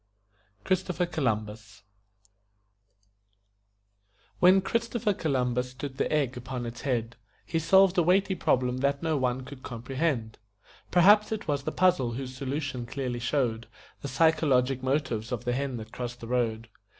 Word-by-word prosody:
CHRISTOPHER 185 -1 0
COLUMBUS 110 - -3 2.6
When 185 +2 +6
Christopher 230 +1 -1
Columbus 125 -7 -1
stood 130 +1 -7
the - - -1
egg 140 -4 +1
upon 125 0 -5
its 120 +4 -7
end, 120 -2 -1 0.3
He 165 - -1
solved 190 +3 +5
a - - +6
weighty 190 +3 +3
problem 125 -7 +1
that 140 +2 0
no 160 -1 +1
one 130 -2 0
could 130 0 -10
comprehend 125 -1 -3 0.5
Perhaps 205 +5 +5
it 220 -1 -4
was 145 -2 -1
the - - -1
puzzle 175 -10 +2
whose 130 +1 -6
solution 135 -2 -4
clearly 125 -1 -3
showed 120 -3 -1 0.3
The 140 - -4
psychologic 135 -3 +2
motives 130 -4 -1
of 120 -1 -3
the 120 - 0
hen 135 -1 -2
that 110 0 -9
crossed 120 0 -6
the - - -6
road. 115 -2 -1
130 Hz, 140 wpm, -28 LUFS, 120-160 Hz, 2.6 s, When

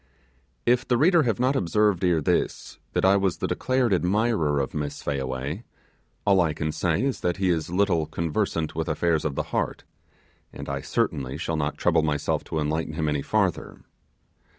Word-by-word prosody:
If 125 +1 +2
the 120 - +2
reader 170 +5 +5
has 115 - -1
not 130 +3 +2
observed 100 -1 +2
ere 85 -3 +3
this - - -1
that - - +1
I 95 +1 +5
was 95 -3 0
the - - -2
declared 130 -4 +1
admirer 90 -5 +1
of 65 -2 -2
Miss 75 -1 -4
Fayaway, 70 - -3 0.6
all 95 -2 +5
I 80 -3 +1
can 75 0 -2
say 90 +7 0
is 135 -1 -1
that 90 +1 -1
he 95 -2 +2
is 80 -2 -1
little 90 -4 +1
conversant 85 -1 -1
with 80 +1 -3
affairs 80 0 +1
of 75 -3 -1
the - - -1
heart, - - -1 0.7
and - - -8
I 70 0 -3
certainly 65 -1 -1
shall 80 - -2
not 75 -1 -2
trouble - - +3
myself 75 -2 -1
to - - -4
enlighten 80 +1 -1
him 80 0 -1
any 75 -1 0
farther. - - -1
85 Hz, 180 wpm, -25 LUFS, 75-100 Hz, 0.7 s, reader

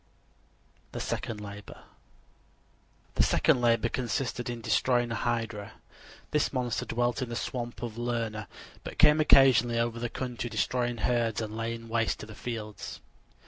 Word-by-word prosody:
THE - - -4
SECOND 110 -3 -3
LABOR 105 0 -9 1.3
The - - +2
second 125 - +3
labor 115 -1 +3
consisted 120 0 -2
in 120 -1 -4
destroying 120 +1 +2
a - - -1
hydra. 115 -3 -2 0.6
This 150 - +2
monster 125 -3 -1
dwelt 120 +2 0
in 125 - -2
the 120 - -4
swamp 120 0 -4
of 115 -1 -5
Lerna, 115 -4 -2 0.4
but - - -7
came 150 +1 +6
occasionally 130 -5 +6
over 115 0 0
the 120 0 -2
country, 120 -1 -4
destroying 120 +2 0
herds 115 -3 +1
and 110 -1 -4
laying 115 0 -4
waste 115 -1 0
the 110 - -10
fields. 110 -3 -6
120 Hz, 140 wpm, -29 LUFS, 115-120 Hz, 1.3 s, came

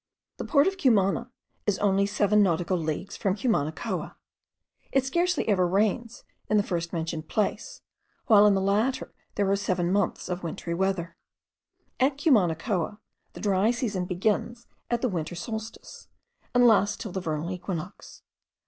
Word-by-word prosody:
The - - -5
port 285 -3 +4
of 385 0 -1
Cumana 230 - +2 0.4
is 205 -2 +2
only 200 0 +2
seven 210 0 +3
nautical 175 -1 +1
leagues 160 +3 -3
from 195 -2 0
Cumanacoa. 195 - -2 0.8
It 270 -1 +2
scarcely 345 +4 0
ever 185 -4 +3
rains 215 +5 0 0.3
in 215 - +3
the 205 - +3
first 170 -3 -3
mentioned 165 -1 -4
place, - - -2 0.4
while 210 -3 +7
in 205 - +4
the 195 - +1
latter 210 +7 0 0.2
there 200 - +1
are - - +4
seven 185 -3 -1
months 200 -1 0
of 180 0 -3
wintry 170 0 -4
weather. 185 -1 -1 0.8
At 270 +1 +2
Cumanacoa, 205 - +1 0.4
the - - -10
dry 200 +1 +2
season 230 -7 -1
begins 215 +6 -1 0.2
at 240 0 -1
the - - +3
winter 175 -4 -3
solstice, 220 +5 -7 0.5
and 245 0 +6
lasts 205 -2 +4
till 210 - -6
the 190 - -3
vernal 160 +1 -3
equinox. 180 0 -7
200 Hz, 150 wpm, -27 LUFS, 180-225 Hz, 0.8 s, while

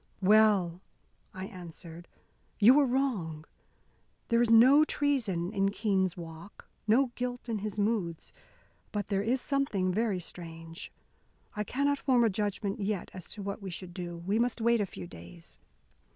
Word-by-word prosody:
"Well!" 195 -4 +4 0.5
I 185 0 -6
answered. 170 -2 -10 0.5
"You 225 +5 +8
were 285 -1 +4
wrong. 210 - -1 0.8
There 235 0 +4
is 240 - +2
no 255 +6 +7
treason 225 - 0
in 195 -1 +2
Keene's 195 -4 0
walks, 165 +3 -10 0.2
no 245 +4 +4
guilt 245 0 -4
in 225 -3 -2
his 210 0 -5
moods. 205 -6 -1 0.6
But 205 0 -3
there 195 -1 +1
is 240 +5 0
something 245 -10 0
very 210 -2 0
strange. 165 0 -8 0.6
I 210 - -1
cannot 280 +5 0
form 250 -3 +3
a 225 - +3
judgment 205 0 -2
yet 200 -2 -2
as 185 -2 -8
to 205 - -7
what 200 +1 -4
we 195 - -5
should 175 0 -7
do. 175 -1 -6
We 195 +6 -1
must 240 0 0
wait 235 0 +3
a 200 - -1
few 95 - -8
days. 85 0 -11
205 Hz, 155 wpm, -30 LUFS, 175-235 Hz, 0.8 s, You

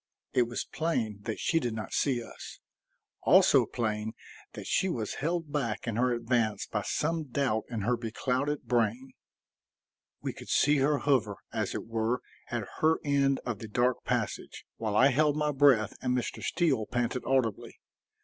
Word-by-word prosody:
It 125 -2 +3
was 120 - -3
plain 115 -11 -2
that 110 - -3
she 165 - +2
did 120 -6 -2
not 110 -2 -6
see 125 -4 +1
us; - - -10 0.6
also - - +5
plain 110 -1 -2 0.4
that - - -8
she 190 - +1
was 115 - -2
held 165 0 -1
back 120 -7 -2
in 115 - -1
her 125 +1 +2
advance 115 -3 0
by 105 - -2
some 160 +8 -1
doubt 130 -4 0
in 115 -3 -3
her 120 +5 +1
beclouded 125 +5 -2
brain. 120 +2 0 1.1
We - - -4
could - - -11
see 145 +1 +4
her 145 +2 +3
hover, 125 -9 +1 0.2
as - - -2
it - - -4
were, 115 +2 -1 0.3
at - - -3
her 160 +1 +4
end 140 -1 +2
of 120 -5 -3
the 110 - -7
dark 120 +3 +1
passage, - - -3
while 110 -2 -2
I 130 +5 +6
held 150 +2 +2
my 150 -1 +1
breath 135 -7 +4
and 125 0 +1
Mr. 120 - -3
Steele 140 -11 +1
panted 125 +1 -1
audibly. 130 -5 0
125 Hz, 170 wpm, -29 LUFS, 110-140 Hz, 1.1 s, I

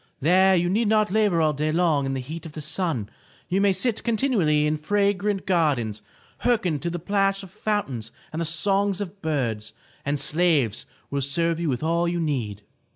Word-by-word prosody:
There 185 +6 +4
you 175 0 +2
need 210 +5 +1
not 215 -2 +2
labor 205 -5 +2
all 155 -1 +3
day 150 +2 -1
long 155 -4 +2
in 135 - -2
the 130 - -2
heat 160 +6 -7
of 155 - -12
the 155 - -6
sun. 150 - -1 0.4
You 190 +2 +1
may 200 -1 +4
sit 215 +4 0
continually 210 - +2
in 150 +1 +1
fragrant 200 +4 0
gardens, 140 - +1 0.4
hearken 185 -11 +1
to 170 - -3
the 175 - -3
plash 195 +2 0
of 190 - -11
foun 210 0 -1
tains 115 -4 -7 0.2
and 160 - -2
the - - 0
songs 195 +4 +1
of 200 0 -6
birds, 125 -9 -2 0.3
and 145 +1 -1
slaves 150 - +1 0.2
will 140 0 -1
serve 165 +5 0
you 170 -2 -1
with 125 +1 -2
all 170 +2 +1
you 175 0 -1
need." 120 -11 -2
170 Hz, 195 wpm, -24 LUFS, 150-195 Hz, 0.4 s, There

